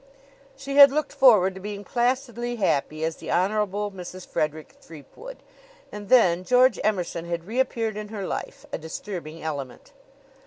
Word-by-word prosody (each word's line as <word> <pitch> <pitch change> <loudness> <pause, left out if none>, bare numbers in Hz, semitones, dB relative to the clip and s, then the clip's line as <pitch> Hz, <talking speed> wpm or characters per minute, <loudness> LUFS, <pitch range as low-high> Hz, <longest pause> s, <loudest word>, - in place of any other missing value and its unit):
She 275 +1 -5
had 280 -1 +10
looked 300 0 -2
forward 205 -8 +5
to 190 - -10
being 205 0 -6
placidly 240 0 -1
happy 155 -6 -1
as 160 0 -2
the - - -9
Honorable 205 +2 0
Mrs. 185 -1 -9
Frederick 155 0 -3
Threepwood. 300 - -12 0.5
And 205 -1 -9
then 185 -8 +4
George 250 +3 +4
Emerson 180 -5 -1
had 170 -1 -4
reappeared 225 -1 -1
in 210 0 -5
her 205 -2 -6
life, - - -6
a - - -4
disturbing 160 0 -7
element. 140 -5 -6
205 Hz, 150 wpm, -25 LUFS, 170-240 Hz, 0.5 s, had